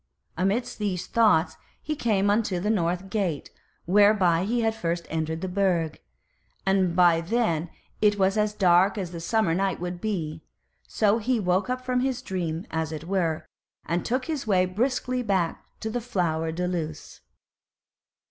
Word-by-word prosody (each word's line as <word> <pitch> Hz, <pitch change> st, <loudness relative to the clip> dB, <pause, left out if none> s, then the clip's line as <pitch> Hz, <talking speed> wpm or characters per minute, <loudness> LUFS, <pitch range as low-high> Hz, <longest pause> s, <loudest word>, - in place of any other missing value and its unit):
Amidst 195 Hz, +9 st, -1 dB
these 190 Hz, -4 st, -2 dB
thoughts 160 Hz, -9 st, +3 dB, 0.2 s
he 305 Hz, -, -3 dB
came 205 Hz, -6 st, +1 dB
unto 205 Hz, -4 st, +1 dB
the 210 Hz, +4 st, 0 dB
North 180 Hz, -1 st, -1 dB
Gate, 185 Hz, -9 st, -2 dB, 0.3 s
whereby 190 Hz, -2 st, +4 dB
he 235 Hz, +3 st, 0 dB
had 225 Hz, -1 st, +1 dB
first 170 Hz, -5 st, -3 dB
entered 160 Hz, 0 st, -2 dB
the 190 Hz, -, -2 dB
Burg, 180 Hz, -4 st, 0 dB, 0.6 s
and 190 Hz, -3 st, +2 dB
by 175 Hz, -2 st, +5 dB
then 175 Hz, -4 st, 0 dB, 0.3 s
it 210 Hz, -1 st, +4 dB
was 195 Hz, 0 st, +2 dB
as 210 Hz, -1 st, +1 dB
dark 185 Hz, +1 st, +4 dB
as 185 Hz, -4 st, -3 dB
the 170 Hz, -, -6 dB
summer 190 Hz, 0 st, +1 dB
night 190 Hz, +1 st, 0 dB
would 175 Hz, 0 st, -5 dB
be; 160 Hz, -7 st, -3 dB, 0.5 s
so 215 Hz, +1 st, +2 dB
he 240 Hz, +2 st, 0 dB
woke 185 Hz, +3 st, +1 dB
up 255 Hz, 0 st, -3 dB
from 250 Hz, 0 st, +1 dB
his 255 Hz, -1 st, -1 dB
dream, 175 Hz, -4 st, -3 dB
as 160 Hz, -1 st, -2 dB
it 155 Hz, -1 st, -6 dB
were, 170 Hz, -3 st, -1 dB, 0.4 s
and 170 Hz, +2 st, -1 dB
took 255 Hz, +2 st, -1 dB
his 305 Hz, -7 st, -3 dB
way 185 Hz, -3 st, +3 dB
briskly 250 Hz, +6 st, -1 dB
back 190 Hz, -7 st, -1 dB, 0.2 s
to 220 Hz, -, -3 dB
the 245 Hz, +2 st, -2 dB
Flower 165 Hz, -8 st, -1 dB
de 180 Hz, +2 st, -2 dB
Luce. 160 Hz, -3 st, -5 dB
190 Hz, 165 wpm, -26 LUFS, 170-215 Hz, 0.6 s, by